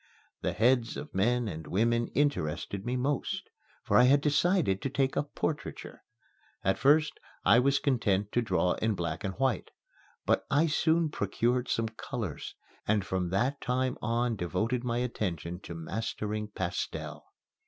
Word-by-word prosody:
The - - -1
heads 120 0 +2
of 150 - -7
men 120 +5 +2
and 80 -6 -6
women 115 +7 +2
interested 100 - 0
me 125 - 0
most, 135 +2 -1 0.4
for - - +3
I 125 - +7
had 140 +3 +6
decided 150 - +2
to 135 - -1
take 135 0 0
up 145 - -2
portraiture. 150 -2 -4 0.6
At 95 - +1
first 150 +2 +4 0.3
I 115 - +7
was 135 +2 +3
content 105 -8 +1
to 120 - +2
draw 100 -5 +1
in 110 -1 0
black 85 -3 -3
and 95 -1 -3
white, 130 -7 0 0.6
but - - +2
I 145 +4 +4
soon 160 +1 +2
procured 120 +3 0
some 115 -1 0
colors 110 - -5 0.3
and 105 -2 +2
from 95 -2 -1
that 120 +10 0
time 130 0 0
on 115 +1 0
devoted 110 +7 -1
my 120 -1 -1
attention 90 -8 -2
to 85 - -8
mastering 105 +4 -3
pastel. 95 -4 -4
115 Hz, 155 wpm, -30 LUFS, 95-135 Hz, 0.6 s, I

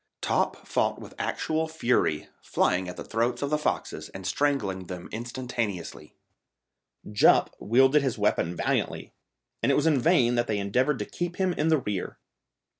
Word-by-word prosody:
Top - - 0
fought - - 0
with - - -11
actual 160 0 -1
fury, 125 - 0
flying 90 0 0
at 90 - -8
the - - -5
throats 120 +3 -1
of 140 - -2
the 150 - +3
foxes - - -2
and 95 -1 -9
strangling 100 -6 0
them 90 -1 -7
instantaneously. 120 -5 -4 1.0
Jup 105 - +4
wielded 130 +6 +4
his 135 -4 -1
weapon 85 +2 +1
valiantly, - - -2 0.5
and 120 - +3
it - - +3
was 150 - +2
in 155 -4 +4
vain 125 -5 +3
that 120 0 +1
they 105 - 0
endeavoured 125 +9 +1
to - - -3
keep 175 0 -4
him 185 -1 +1
in 155 -1 0
the 160 -1 +4
rear. 105 -8 -4
120 Hz, 165 wpm, -27 LUFS, 100-150 Hz, 1.0 s, Jup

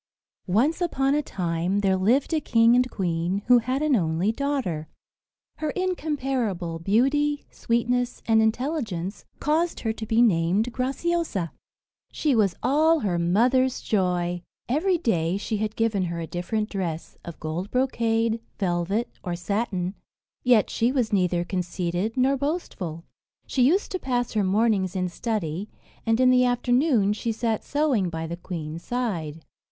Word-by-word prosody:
Once 255 - +2
upon 275 -5 +1
a 300 - +2
time 180 - -1
there 190 -1 +3
lived 235 - +2
a 310 - +1
king 230 -1 +4
and 250 0 +3
queen, 180 0 -1
who 245 0 +6
had 255 +5 -1
an 305 -3 +3
only 170 +1 +1
daughter. 225 - -2 0.7
Her 310 - -2
incomparable 265 - -2
beauty, 275 - +1
sweetness, 245 +1 -1
and 220 -1 +4
intelligence 220 - -2
caused 325 +3 0
her 225 -1 -1
to 220 - -6
be 225 +1 +2
named 200 +3 +2
Graciosa. 270 - -1 0.6
She 300 -3 +1
was 205 -6 +2
all 315 +4 +3
her 180 -6 0
mother's 245 +9 +2
joy. 180 -3 0 0.3
Every 345 +9 +2
day 180 - 0
she 215 +1 -2
had 215 0 -2
given 215 -5 +1
her 170 -1 -4
a 165 - -3
different 180 +6 -2
dress, 170 -5 -4
of 170 - -9
gold 170 +5 -4
brocade, 230 -3 +1 0.2
velvet, 190 +4 0 0.2
or 175 -2 -2
satin; 185 -1 -2 0.5
yet 245 -4 +4
she 235 +2 +1
was 250 -5 0
neither 180 -3 +2
conceited 180 +4 -2
nor 265 +2 +3
boastful. 260 - -3 0.4
She 260 - -1
used 335 +11 +3
to 370 - -2
pass 245 -4 -1
her 215 -2 +2
mornings 195 -1 +1
in 185 -1 0
study, 200 -2 -3 0.4
and 225 +1 +3
in 255 0 +5
the 250 0 +5
afternoon 245 -3 +2
she 230 +2 -2
sat 225 -1 -1
sewing 275 -11 +1
by 165 -1 -4
the 165 +1 -4
queen's 165 -2 -6
side. 170 -11 -3
220 Hz, 150 wpm, -25 LUFS, 180-255 Hz, 0.7 s, who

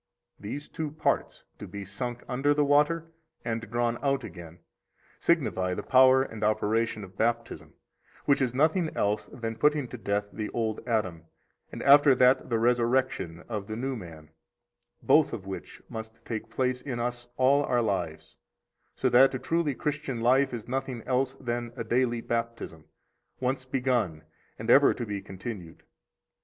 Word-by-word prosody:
These 140 +9 -6
two 155 -2 -4
parts, 155 +2 -1 0.2
to - - -7
be 100 -1 -7
sunk 120 +5 -5
under 135 +3 +1
the 145 0 +3
water 150 +3 +2 0.3
and 115 -1 -1
drawn 120 0 0
out 140 -1 +1
again, 85 -2 -10 0.6
signify 100 - +1
the - - -4
power 130 0 +6
and 110 -5 -7
operation 110 +1 +1
of 95 0 -12
Baptism, 115 +1 -2 0.5
which 140 -1 +3
is 130 -2 +1
nothing 160 +6 +2
else 105 +1 0
than 115 -2 -5
putting 150 -2 +2
to 125 - -8
death 100 -1 -1
the 105 -1 -4
old 110 -2 -1
Adam, 95 -8 -1 0.5
and - - -6
after 140 -1 +7
that 130 +1 +4
the 115 - +1
resurrection 120 -7 +1
of 105 -4 -4
the 110 - -4
new 130 +3 -2
man, 80 -7 -10 0.7
both - - +4
of 95 - -5
which 95 0 -8
must 110 0 -8
take 110 -1 -5
place 125 +1 -1
in 125 -4 -4
us 120 0 -3
all 135 +2 +4
our 120 -3 +1
lives, 90 -7 -3 0.6
so - - 0
that 135 +2 +6
a - - 0
truly 160 0 0
Christian 145 -4 -3
life 130 +4 +3
is 120 -3 -6
nothing 130 -2 -3
else 130 +1 0
than 120 -2 -4
a - - -4
daily 120 +1 +1
baptism, 115 -10 -4 0.5
once 130 +1 -1
begun 125 -12 0 0.3
and 110 +2 0
ever 140 +2 +6
to 120 - -4
be 100 -2 -4
continued. 95 -3 -8
120 Hz, 160 wpm, -28 LUFS, 110-135 Hz, 0.7 s, after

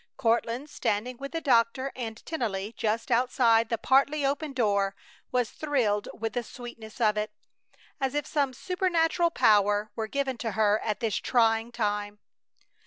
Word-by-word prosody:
Courtland, 235 +3 0
standing 245 -3 -2
with 275 +2 -7
the 330 - -2
doctor 260 +1 +2
and 230 -3 -6
Tennelly 220 -9 -3
just 225 +3 -1
outside 230 -2 +3
the 230 - 0
partly 275 +5 +3
open 285 +2 -1
door, 200 -6 +1 0.4
was 250 -2 0
thrilled 245 -9 0
with 225 0 -4
the 245 - 0
sweetness 235 -2 -10
of 215 -2 +3
it, 210 0 -1 0.7
as 270 0 -1
if 295 - 0
some 280 -3 0
supernatural 345 +2 +1
power 205 -6 +3
were 220 -1 -3
given 265 0 -2
to 225 -3 -3
her 215 -1 +3
at 215 -2 -3
this 225 -3 0
trying 225 -1 +2
time. 210 -2 -2
235 Hz, 155 wpm, -28 LUFS, 215-270 Hz, 0.7 s, outside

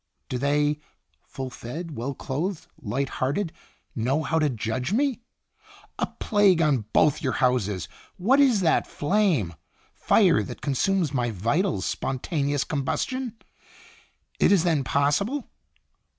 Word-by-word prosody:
Do 125 - -2
they, 145 +2 +1 0.5
full 130 -1 -6
fed, 155 +7 -7
well 130 +4 -3
clothed, 160 +9 -3 0.2
light 135 +6 -1
hearted, 160 +7 0 0.4
know 130 +6 0
how 160 0 +1
to 150 -2 +2
judge 120 - -2
me? 260 +2 +1 0.8
'A - - +1
plague 205 -5 +4
on 145 -9 +2
both 150 +1 +3
your 130 -5 0
houses!' 105 -9 +1 0.3
What 240 +10 +3
is 255 -8 +4
that 165 -3 +2
flame? 155 - +1 0.4
Fire - - +4
that - - -7
consumes 155 +3 +1
my 120 -2 0
vitals 115 - 0
spon 135 - -2
ta 160 +6 -5
neous 140 -1 0
combustion! 240 - -2 1.0
It - - +4
is 190 -5 +5
then 160 -6 +2
possible. 150 - 0
145 Hz, 135 wpm, -25 LUFS, 130-190 Hz, 1.0 s, is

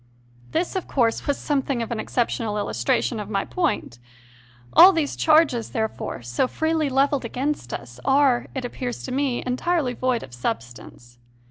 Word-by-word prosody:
This, 345 +4 -1
of 375 - -3
course, 235 -4 0
was 285 - +1
something 275 -4 -1
of 230 - -7
an 230 - -2
exceptional 225 -2 -1
illustration 165 - 0
of 210 -1 -6
my 195 -2 -1
point. 340 - -2 0.7
All 365 +3 +10
these 315 -4 -1
charges, 305 -7 +3
there 220 -1 0
fore, 130 - -7
so 120 - 0
freely 315 +1 0
levelled 275 +1 +2
against 255 - -3
us, 120 0 -7
are, 270 -3 +3
it 260 -2 -3
appears 245 0 -5
to 260 - -5
me, 265 -2 0
entirely 255 +2 0
void 250 -1 -1
of 125 - -12
substance. 120 0 -6
250 Hz, 160 wpm, -23 LUFS, 215-285 Hz, 0.7 s, All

